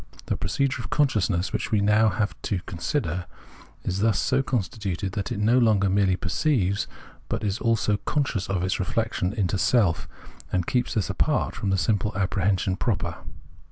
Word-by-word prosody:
The - - -1
procedure 135 -3 -1
of 100 - -7
consciousness, 105 - +1
which - - -2
we 110 - +3
have 100 - +2
now 105 -1 +3
to 95 - -1
consider, 85 - -2 0.6
is 95 - -2
thus 110 -2 +2
so 130 +8 +2
constituted 100 -6 -2
that 100 -1 -3
it - - -2
no 110 +5 +4
longer 105 -5 +3
merely 95 -1 +3
perceives, 100 0 0 0.4
but 115 0 -2
is 105 +2 -1
also 115 -3 +2
conscious. 115 -6 -1
of 95 -2 0
its 95 - 0
reflection 105 -1 -1
into 100 -3 -1
self, 100 -4 +2 0.4
and 90 -2 0
keeps 125 +4 0
this 105 -5 0
apart - - 0
from 100 - -2
the 95 - +2
simple 105 +2 0
apprehension 95 -1 +1
proper. 90 -8 -1
100 Hz, 165 wpm, -25 LUFS, 95-115 Hz, 0.6 s, no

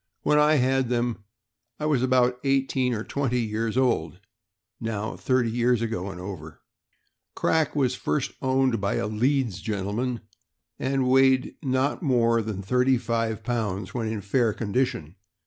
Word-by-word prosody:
When 150 - +3
I 150 +1 +5
had 130 -2 +2
them, 120 -3 -1 0.5
I 150 - -2
was 145 -5 +2
about 125 -1 +2
eighteen 135 -2 +1
or 110 - -3
twenty 130 -2 -1
years 110 +1 -2
old 90 - +1 0.3
— 105 +1 -61
now 110 0 -3
thirty 130 -3 +1
years 120 0 +1
ago 100 -4 -3
and 90 -2 -8
over.... 90 -5 -8 0.7
Crack 160 -2 +1
was 130 -4 +2
first 135 +1 -2
owned 130 -4 +1
by 100 - 0
a - - -1
Leeds 120 0 0
gentleman, 110 +4 -2 0.6
and 135 0 0
weighed 130 0 +4
not 135 +2 0
more 115 -6 +2
than 105 -3 -5
thirty 125 +5 +2
five 115 -2 -2
pounds 110 -5 -2
when 115 -3 -2
in 110 -1 -3
fair 110 +3 +1
condition. 100 - -2
120 Hz, 150 wpm, -25 LUFS, 110-130 Hz, 0.7 s, I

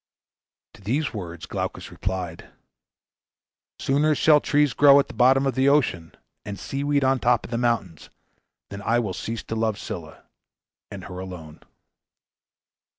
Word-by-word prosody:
To - - -17
these 130 +9 -1
words 85 -6 -7
Glaucus - - -5
replied, 95 -3 -5 1.3
"Sooner 150 +3 +1
shall 150 0 +5
trees 145 -2 +2
grow 140 0 +7
at 140 - +1
the - - -10
bottom 130 +2 +4
of 135 - +1
the 135 +1 +3
ocean, 105 - +1 0.3
and 100 -1 -6
sea 135 +7 -4
weed 145 -1 +1
on 135 0 +3
the - - -11
top 120 -1 +2
of - - -11
the 115 - -1
mountains, 115 -9 -2 0.6
than 100 0 -7
I 115 +3 +1
will 110 -6 -1
cease 115 +4 -5
to 115 - -5
love 110 -2 0
Scylla, - - -8 0.7
and 100 -2 -8
her 90 -1 -8
alone." 85 -5 -9
115 Hz, 155 wpm, -24 LUFS, 95-135 Hz, 1.3 s, grow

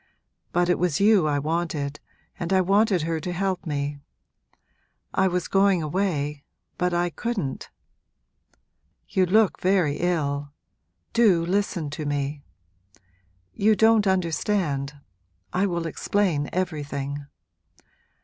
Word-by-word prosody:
But 175 0 +2
it 175 - +2
was 175 -5 +1
you 200 -5 +5
I 145 -1 +1
wanted, 150 -1 -2 0.4
and 175 +1 -3
I 190 - +4
wanted 195 -1 +3
her 165 0 -1
to 180 +2 -4
help 185 0 -2
me. 145 -1 -2 1.1
I 190 - +3
was 180 -1 -1
going 195 -3 +3
away 150 -4 -1 0.4
but 180 0 +1
I 175 0 0
couldn't. 195 - -3 1.4
You 185 -1 +1
look 215 +2 +3
very 180 -6 +2
ill 145 -5 -1 0.6
do 200 -8 +4
listen 180 -5 -1
to 150 0 -4
me! 145 0 -2 1.1
You 215 - +3
don't 220 -1 +4
understand 165 -6 0 0.6
I 190 +3 +2
will 170 -2 -2
explain 165 -2 0
everything. 145 -5 -3
175 Hz, 115 wpm, -25 LUFS, 145-190 Hz, 1.4 s, you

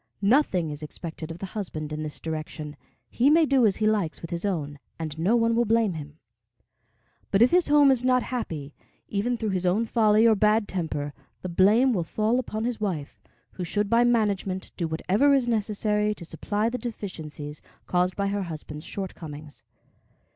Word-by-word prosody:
Nothing 195 - +3
is 145 0 -7
expected 160 +1 -7
of 165 - -6
the 195 - -5
husband 155 -7 -4
in 155 - -4
this 155 -1 -5
direction; 155 -1 -5 0.3
he 255 +4 +2
may 320 +2 +5
do 270 -5 +4
as 195 - +1
he 215 - -1
likes 205 -7 +1
with 165 - -8
his 170 +3 -3
own, 145 -7 -2 0.2
and 155 -2 -5
no 190 +8 +3
one 230 -1 +3
will 240 - +3
blame 225 -3 +2
him; 150 -1 -8 1.1
but 195 +3 +5
if 245 - +4
his 355 0 +4
home 290 -1 +6
is 250 -2 +1
not 255 -1 +3
happy, 155 - -4 0.4
even 235 +4 0
through 220 -3 -2
his 185 -1 -1
own 190 +6 +2
folly 220 -1 +4
or 225 - +6
bad 210 +1 +3
temper, 150 -5 -3 0.3
the 185 - -3
blame 210 +9 +4
will 180 -5 0
fall 220 +8 0
upon 220 -3 -3
his 240 -2 -2
wife, 170 -9 -3 0.3
who 180 - -6
should 205 +4 -1
by 235 +1 +5
management 205 -5 0
do 170 - -2
whatever 200 - +2
is 260 -3 +1
necessary 210 -1 0
to 170 - -10
supply 205 +6 -2
the 250 +2 -2
deficiencies 155 -10 -6 0.2
caused 180 0 +1
by 200 0 0
her 200 0 -1
husband's 155 -3 -7
shortcomings. 155 -6 -7
200 Hz, 185 wpm, -26 LUFS, 160-230 Hz, 1.1 s, home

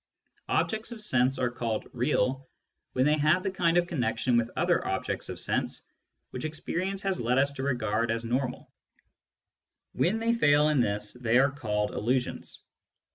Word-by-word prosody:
Objects 220 +2 0
of 235 - -7
sense 130 -10 +2
are 125 -1 0
called 115 -2 -3
" - - -37
real 130 +1 0 0.2
'* - - -54
when 130 +1 +2
they 150 +1 +3
have 155 +5 +3
the 195 - -1
kind 170 -2 +2
of 175 - +3
connection 120 -6 0
with 120 0 +2
other - - +2
objects - - -3
of - - -5
sense - - -1 0.5
which 125 - -6
experience 180 +5 -3
has 195 -5 -1
led 120 +2 +1
us 140 +1 +3
to 140 - -6
regard 115 -4 0
as 115 +1 -1
normal; 125 +2 -2 1.2
when 195 +6 +1
they 230 +1 +1
fail 150 -8 +4
in 150 -3 +2
this, 105 -2 -1
they 120 -1 +1
are 135 +1 +4
called 105 -7 -2
" - - -12
illusions." 125 +4 -2
130 Hz, 180 wpm, -28 LUFS, 120-155 Hz, 1.2 s, fail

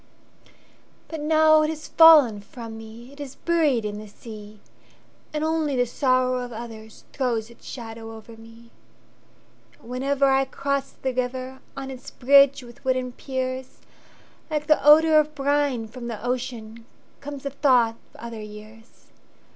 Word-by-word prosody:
But 320 - -5
now 310 0 +5
it 305 - +1
has 310 -1 -6
fallen 295 -11 +7
from 230 +1 -9
me, 225 +4 -11
It 285 - -17
is 280 -2 -7
buried 305 -9 +1
in 210 0 -4
the 215 - -10
sea; 210 0 -12 0.7
And 305 0 -2
only 315 -3 0
the 245 -1 +2
sorrow 255 0 +1
of 245 0 -5
othersThrows 230 +1 -5
its 235 - -17
shadow 225 -2 -8
over 225 +1 -12
me, 230 +1 -16 1.0
Yet - - -26
whenever 270 +3 0
I 270 0 +3
cross 275 +1 -3
the 260 -1 0
riverOn 260 +1 -5
its 255 -1 -9
bridge 275 +1 +5
with 240 -1 -15
wooden 255 -1 0
piers, 260 0 -5 0.7
Like 300 -1 -2
the 305 -1 +3
odor 310 +2 +7
of 305 0 -1
brine 280 -4 0
from 235 +1 -8
the 235 - -4
oceanComes 250 +3 -6
the 280 - -3
thought 255 -5 +3 0.2
of - - -30
other 230 -1 -8
years. 215 +2 -13
255 Hz, 145 wpm, -24 LUFS, 230-280 Hz, 1.0 s, fallen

